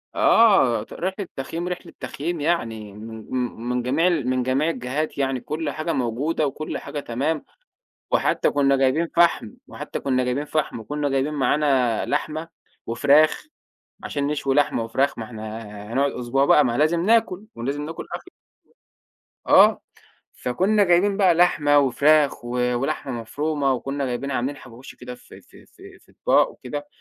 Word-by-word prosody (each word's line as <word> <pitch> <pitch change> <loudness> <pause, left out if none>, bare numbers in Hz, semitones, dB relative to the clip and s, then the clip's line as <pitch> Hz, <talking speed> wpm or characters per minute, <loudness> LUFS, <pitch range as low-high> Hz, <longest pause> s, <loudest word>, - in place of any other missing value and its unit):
آه، 195 - +4
ت - - -13
رحلة 190 +1 -4
تخييم، 165 +6 -4
رحلة 180 -1 -6
تخييم 165 +2 -4
يعني، 115 -11 -2
من 110 +1 -9
م 125 -3 -3
من 125 0 0
جميع 150 +8 +2
ال 155 -8 0
من 130 -1 0
جميع 135 +5 +1
الجهات 140 +1 -3
يعني 135 -2 0
كل 155 +3 -4
حاجة 155 +4 -3
موجودة 135 +6 -1
وكل 155 +3 -5
حاجة 145 - -6
تمام، 140 +5 -2 0.7
وحتى - - +2
كنا 140 -1 +3
جايبين 135 +5 +2
فحم، 170 -10 +3 0.2
وحتى - - -6
كنا 130 -2 0
جايبين 130 +4 -1
فحم 150 -6 -2
وكنا 145 +5 -3
جايبين 135 +3 0
معانا 135 -5 +1
لحمة 155 +2 -2 0.4
وفراخ 145 +6 +3 0.6
عشان 140 -1 -2
نشوي 145 -2 -1
لحمة 145 -5 +2
وفراخ، 130 +5 0
ما 115 - -5
إحنا 110 -1 -7 0.3
هنقعد 140 +2 +2
أسبوع 125 +3 0
بقي 150 -1 +5
ما 120 -1 -1
لازم 160 +3 +2
ناكل 215 -3 +2
ولازم 140 +5 -3
ناكل 160 +1 -7
أكل - - -8 1.1
آه، - - +6 0.5
فكنا 195 - +1
جايبين 185 +3 +3
بقى 190 -4 +4
لحمة 150 -4 +4
وفراخ 145 +1 +3
و 120 - -6 0.2
ولحمة 135 +1 -2
مفرومة 145 +4 -1
وكنا 135 +2 -3
جايبين 130 +3 -3
عاملين 130 +3 -2
حواوشي 125 -1 -13
كده 125 0 -8
في - - -15
في - - -19
في - - -16
في - - -25
أطباق - - +2
وكده، 145 +3 -7
140 Hz, 155 wpm, -23 LUFS, 125-155 Hz, 1.1 s, آه